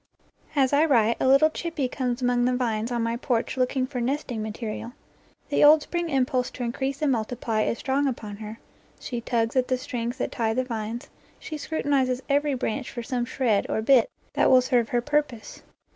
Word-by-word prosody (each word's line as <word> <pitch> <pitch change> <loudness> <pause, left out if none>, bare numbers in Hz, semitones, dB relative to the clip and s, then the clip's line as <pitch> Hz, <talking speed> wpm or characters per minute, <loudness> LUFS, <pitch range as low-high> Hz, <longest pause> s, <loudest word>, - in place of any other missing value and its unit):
As 270 -1 +3
I 295 +3 +5
write, 230 -6 +3
a - - +1
little 275 +4 +5
chippie 315 -5 -2
comes 250 -1 -3
among 245 0 +2
the 250 0 +2
vines 230 -2 -1
on 240 -1 0
my 230 +1 -1
porch 235 -1 -1
looking 255 0 +1
for 255 -2 -4
nesting 250 -2 -2
material. 220 +2 -5 0.6
The 285 - +2
old 300 +1 +7
spring 345 -1 -3
impulse 260 -2 +1
to 250 - -5
increase 265 +4 -3
and 290 - +3
multiply 225 -1 -1
is 230 - 0
strong 275 +2 0
upon 215 -5 -5
her; 215 +1 -8 0.4
she 240 -2 -5
tugs 230 0 -1
at 255 -1 +2
the 255 - +1
strings 240 -1 -4
that - - -2
tie 225 -2 -1
the 255 - +1
vines, 230 -1 -5 0.3
she 310 - -7
scrutinizes 275 -4 0
every 285 0 +2
branch 250 +1 -3
for 240 -3 -6
some 245 0 -2
shred 240 -5 0
or 220 - -1
bit 250 -1 +5 0.2
that - - +3
will 255 -1 +7
serve 245 -2 +1
her 240 - +1
purpose. 290 -4 -2
250 Hz, 195 wpm, -25 LUFS, 230-275 Hz, 0.6 s, old